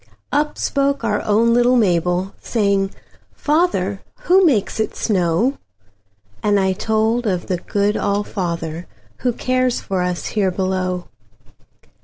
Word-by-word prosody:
Up 300 +1 0
spoke 280 -2 0
our 210 -2 0
own 225 +3 +3
little 245 +1 +4
Mabel, 180 -3 +1
Saying, 200 -3 +1 0.4
"Father, 290 - 0 0.2
who 375 +2 +4
makes 230 - +2
it 220 - -1
snow?"And 105 - -2
I 190 -1 +2
told 220 +4 0
of 180 -3 -1
the 180 - -1
good 205 +3 0
All 200 +1 0
fatherWho 175 +6 -4
cares 255 -1 +1
for 190 -2 -2
us 180 -1 -2
here 200 -3 0
below. 185 -1 -2
200 Hz, 120 wpm, -20 LUFS, 180-235 Hz, 0.4 s, little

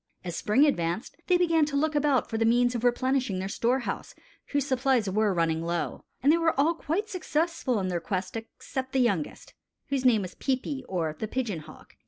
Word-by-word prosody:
As 175 -2 -4
spring 235 - +3
advanced 175 - -1
they 360 - +5
began 330 -3 +3
to 290 -1 -4
look 310 +2 +1
about 290 -3 +2
for 225 - -3
the - - +3
means 245 +2 +3
of 240 -1 -3
replenishing 250 -3 +1
their 190 +1 -2
storehouse, 240 +5 -1 0.3
whose 285 -2 0
supplies 260 -4 +2
were 210 +2 +2
running 165 -2 +1
low; 170 0 -3 0.2
and 285 - +6
they 335 - +4
were 325 -4 +1
all 315 +4 +4
quite 340 +6 -2
successful 330 - -1
in 190 - -1
their 175 -1 -1
quest 185 +3 -3
except 260 +3 -6
the 265 - +2
youngest, 200 -11 -1 0.4
whose 275 -2 0
name 230 -5 +4
was 185 - -7
Peepi, 270 +1 -2
or 165 -4 -1
the 220 - -2
Pigeon 220 -7 -2
Hawk. 155 0 -14
245 Hz, 200 wpm, -28 LUFS, 190-285 Hz, 0.4 s, and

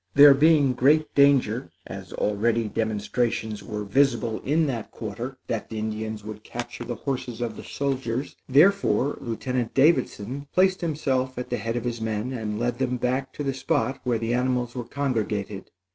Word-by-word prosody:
There 145 0 +10
being 145 -2 +4
great 150 +5 +3
danger, 140 -4 +3 0.2
as - - -8
already 110 +2 0
demonstrations 110 0 -1
were 105 -2 -5
visible 115 0 +1
in 155 +4 +2
that 120 -7 -3
quarter, 120 +4 -6
that 115 -2 -3
the 110 - -5
Indians 110 0 -4
would 105 0 -8
capture - - -6
the - - -4
horses 125 -4 -4
of 115 -2 -3
the - - -9
soldiers, 135 -2 -2
therefore 150 -1 +4
Lieutenant 120 +1 -3
Davidson 140 -3 +2
placed 185 0 +3
himself 135 -6 -1
at 125 - -5
the - - 0
head 115 0 -3
of 120 - -2
his 120 -2 -3
men 110 +3 -2
and 110 -4 -3
led 120 +1 -1
them 125 -1 0
back 130 +2 -1
to 145 - -4
the 135 -1 -1
spot 135 0 -1
where 120 -2 +1
the 115 +1 -1
animals 125 -1 0
were 125 -2 -5
congregated. 110 -8 -2
125 Hz, 170 wpm, -25 LUFS, 110-135 Hz, 0.2 s, There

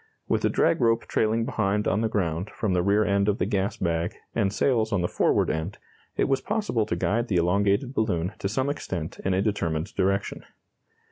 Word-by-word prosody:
With - - 0
a - - +3
drag - - +2
rope 115 0 +2
trailing 115 +1 +1
behind 105 -5 0
on 100 - +1
the 115 - +1
ground 90 -2 -1
from 105 -4 -2
the 90 - +2
rear 100 +3 +3
end 100 0 +2
of 105 - +1
the - - 0
gas 100 -1 -1
bag, 85 -1 -1 0.2
and 100 -4 +1
sails 110 0 +1
on 100 -4 +1
the 90 - +1
forward - - +2
end, 80 +6 -3 0.4
it - - +3
was 135 -1 +1
possible 205 - -1
to 85 - -1
guide 115 +7 0
the 100 - -1
elongated 100 +8 +2
balloon 95 -7 0
to 100 - -2
some 130 +6 0
extent 85 - -5
in 95 -1 +1
a 95 - +1
determined 85 -4 -1
direction. 100 +1 -1
100 Hz, 205 wpm, -26 LUFS, 90-110 Hz, 0.4 s, a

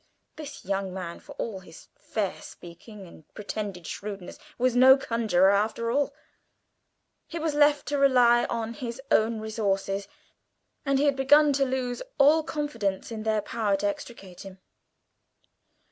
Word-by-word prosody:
This 295 -7 -9
young 195 0 -2
man, 175 -3 -6
for 285 - -13
all 225 -8 -5
his 165 -3 -15
fair 205 -4 -4
speaking 190 +4 -12
and 165 -3 -17
pretended 205 -4 -5
shrewdness, 200 -1 -7 0.2
was 250 0 +1
no 260 +2 +8
conjurer 220 -7 +2
after 220 +3 0
all. 285 +2 +1 1.2
He 340 - -6
was 320 -2 -1
left 290 0 +3
to 290 -1 0
rely 245 -3 +5
on 230 -1 -3
his 235 +1 -6
own 220 0 +2
resources, 200 -2 -2 0.8
and 275 0 +3
he 285 - +2
had 285 -2 +3
begun 290 +2 +5
to 275 0 +2
lose 255 -2 -3 0.2
all 295 +3 +5
confidence 240 -12 -3
in 220 -1 -5
their 215 -1 0
power 210 -2 0
to 205 - -3
extricate 200 -3 -7
him. 190 -1 -11
230 Hz, 145 wpm, -26 LUFS, 200-270 Hz, 1.2 s, no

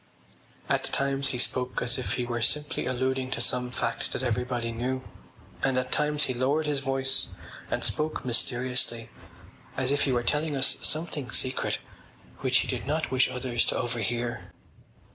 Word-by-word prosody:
At - - +1
times 140 0 +1
he 125 - -1
spoke 125 +1 0
as 125 +1 +2
if 130 - -1
he 125 - -1
were 120 -1 -2
simply 150 +5 +1
alluding 130 +1 0
to 125 - -1
some 125 +1 +1
fact 125 - -1
that - - -3
everybody 120 -1 -1
knew, 130 +3 -2 0.6
and 135 -1 +1
at 130 0 -1
times 150 0 +2
he 130 - +1
lowered 135 +5 +1
his 145 -2 0
voice 135 0 +2 0.4
and - - -1
spoke 155 -2 -1
mysteriously 120 -1 +1 0.7
as 130 0 +2
if 145 - +2
he 135 - +1
were 120 -1 +1
telling 150 +3 0
us 135 0 +3
something 155 -5 0
secret 130 +4 0 0.6
which - - +3
he - - -4
did - - -3
not 155 0 -1
wish 130 0 +4
others 125 -2 0
to - - 0
overhear. 120 0 -2
130 Hz, 165 wpm, -28 LUFS, 120-135 Hz, 0.7 s, wish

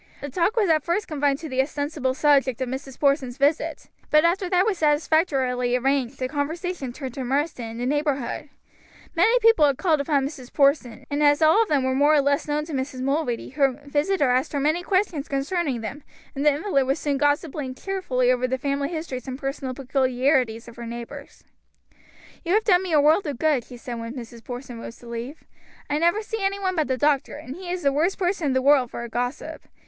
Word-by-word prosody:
The 285 - -6
talk 365 - +1
was 420 -3 +3
at 310 -3 +3
first 350 +5 -1
confined 285 -2 0
to 320 - -5
the 260 -2 +1
ostensible 285 -1 -2
subject 275 -4 +3
of 260 - -2
Mrs. 265 +1 -6
Porson's 275 -3 +1
visit; 290 +2 0 0.2
but 305 +2 +5
after 360 +2 +1
that 365 +1 +3
was 410 -5 0
satisfactorily 290 -5 +1
arranged 265 0 0
the 255 - -2
conversation 305 +1 -3
turned 260 -1 -7
to 265 - -4
Marsden 275 +1 -1
and 225 +1 -8
the 245 - -2
neighborhood. 285 -1 -1 0.6
Many 405 +9 +4
people 455 -7 +5
had 275 -2 0
called 320 -6 +2
upon 280 -2 +1
Mrs. 265 -3 -8
Porson, 275 -4 +1
and 290 +1 0
as 290 0 +5
all 320 +8 +6
of 450 - 0
them 285 -3 +2
were 260 0 +1
more 290 +3 +4
or - - +5
less 285 +1 0
known 300 0 -1
to 320 - -8
Mrs. 260 -1 -3
Mulready, 275 -3 -1
her 270 -1 +1
visitor 290 0 +1
asked 255 +4 0
her 285 - 0
many 310 +5 +1
questions 365 -6 0
concerning 275 -2 -1
them, 230 +7 -6 0.3
and 275 - -3
the 300 - +6
invalid 285 -3 0
was 270 - +1
soon 285 -2 -1
gossiping 290 -2 -1
cheerfully 260 -9 0
over 255 0 +1
the 260 +1 -1
family 280 +1 -1
histories 315 -7 -5
and 260 0 -4
personal 270 -1 -4
peculiarities 255 -3 +1
of 235 - -12
her 235 -1 -7
neighbors. 240 +5 -9 1.0
"You 350 +2 +1
have 435 - +3
done 365 -4 +4
me 370 -2 -4
a 305 - +5
world 310 +5 +4
of 285 -4 -3
good," 295 -5 +1
she 250 - -11
said 235 0 -6
when 230 +2 -6
Mrs. 235 -2 -9
Porson 245 -1 -7
rose 230 - -9
to 240 - -15
leave. 235 +6 -6 0.5
"I 295 - +1
never 345 +6 +2
see 445 0 -4
any 395 +1 0
one 375 -2 -1
but 310 -3 +1
the 260 - 0
doctor, 290 +1 +1
and 290 -2 -8
he 360 0 -8
is 360 -1 -3
the 280 -1 +3
worst 330 +7 +1
person 360 -4 0
in 270 - +1
the 260 0 +1
world 275 -3 +4
for 235 - -6
a - - -5
gossip. 245 +3 -4
285 Hz, 220 wpm, -24 LUFS, 260-315 Hz, 1.0 s, all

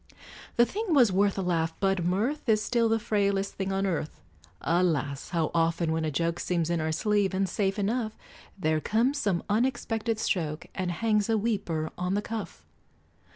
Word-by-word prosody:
The 240 - +6
thing 400 - -1
was 245 -7 +6
worth 200 +1 +2
a 195 - -1
laugh, 165 -2 0
but 195 -2 +1
mirth 230 - -1
Is 215 -1 +3
still 230 0 +2
the 225 - +3
frailest 200 -3 0
thing 195 0 -3
on 195 0 0
earth: 165 -5 -2 0.4
Alas! 155 -6 0
how 165 -3 0
often 165 0 +1
when 160 0 0
a - - 0
joke 165 +3 -1
Seems 170 -2 0
in 170 -2 0
our 160 0 -1
sleeve, 200 +3 +1
and 195 0 +1
safe 195 +1 -1
enough, 220 +2 -1 0.4
There 155 -4 +1
comes 245 - +1
some 190 -4 0
unexpected 225 0 0
stroke 160 -8 -1
And 185 -2 -2
hangs 210 +2 +1
a 225 - +3
weeper 185 -8 -1
on 180 +2 0
the 205 - -1
cuff! 225 0 -6
195 Hz, 180 wpm, -28 LUFS, 170-220 Hz, 0.4 s, The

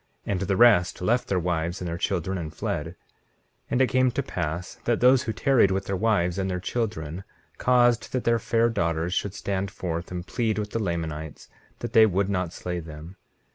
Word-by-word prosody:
And 95 - -1
the 95 0 0
rest 110 -7 +5
left 120 +7 +1
their 95 - 0
wives 85 0 -1
and 90 - -4
their 85 - -3
children 95 +1 -1
and 80 -2 -5
fled. 75 -1 -3
19:13 85 - -10 0.7
And 125 - +1
it - - +3
came 130 0 +3
to - - -2
pass 85 +4 -4
that 120 -1 +1
those 125 +1 +5
who 115 - -3
tarried 125 -3 +3
with 95 0 -1
their 95 - -2
wives 95 -4 +1
and 95 0 -1
their 90 -1 -2
children 95 -5 -3 0.4
caused 120 -2 +3
that 130 - -1
their 115 0 +2
fair 115 +2 +2
daughters 85 -4 -1
should 100 +1 -2
stand 100 0 -2
forth 85 -4 -4
and 90 -1 -5
plead 115 -2 -1
with 105 -1 -3
the 115 - -1
Lamanites 80 -5 -4 0.3
that - - -5
they 110 -1 +7
would 100 0 0
not 90 -3 -1
slay 90 0 -4
them. 80 +2 -10
95 Hz, 205 wpm, -26 LUFS, 85-115 Hz, 0.7 s, they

